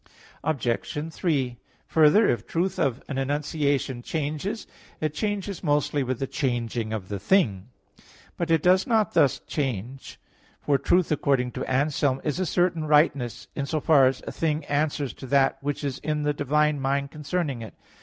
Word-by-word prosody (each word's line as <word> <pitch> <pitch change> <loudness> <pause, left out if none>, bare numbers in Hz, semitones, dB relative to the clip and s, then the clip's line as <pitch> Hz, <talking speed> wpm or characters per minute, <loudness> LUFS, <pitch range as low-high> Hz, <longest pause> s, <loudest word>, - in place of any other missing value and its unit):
Obj. 150 +3 -2
3: 135 -9 -1 0.3
Further, 160 +7 +5
if 120 - +2
the - - -21
truth 185 +2 0
of 135 -6 0
an 135 - -3
enunciation 140 -2 -1
changes, 155 - -3 0.3
it 155 -1 -1
changes 200 0 -3
mostly 145 0 +1
with 130 -1 -1
the 135 - -2
changing 120 -5 -2
of 105 -4 -4
the 100 0 -4
thing. 105 - +2 0.7
But 170 -1 -3
it 165 -2 +3
does 185 +1 +4
not 220 -3 +2
thus 140 - +4
change. 130 -2 -4 0.4
For 140 -2 +2
truth, 175 +3 +2
according 135 -4 +1
to - - -4
Anselm 140 0 +1
(De 135 - -11
Verit. - - -26
viii), - - 0
"is 150 - -2
a 185 - +1
certain 170 -2 +1
rightness" 150 -5 +2
in 140 -1 -2
so 155 - -1
far 145 -3 +5
as 130 0 -2
a - - -4
thing 155 -2 -1
answers 145 -2 -1
to 135 - -10
that 135 0 +3
which 145 +1 -3
is 140 -3 -3
in 150 0 -2
the 150 0 +1
divine 150 +1 +1
mind 140 +1 0
concerning 150 -4 -3
it. 110 - -9
145 Hz, 180 wpm, -25 LUFS, 130-155 Hz, 0.7 s, Further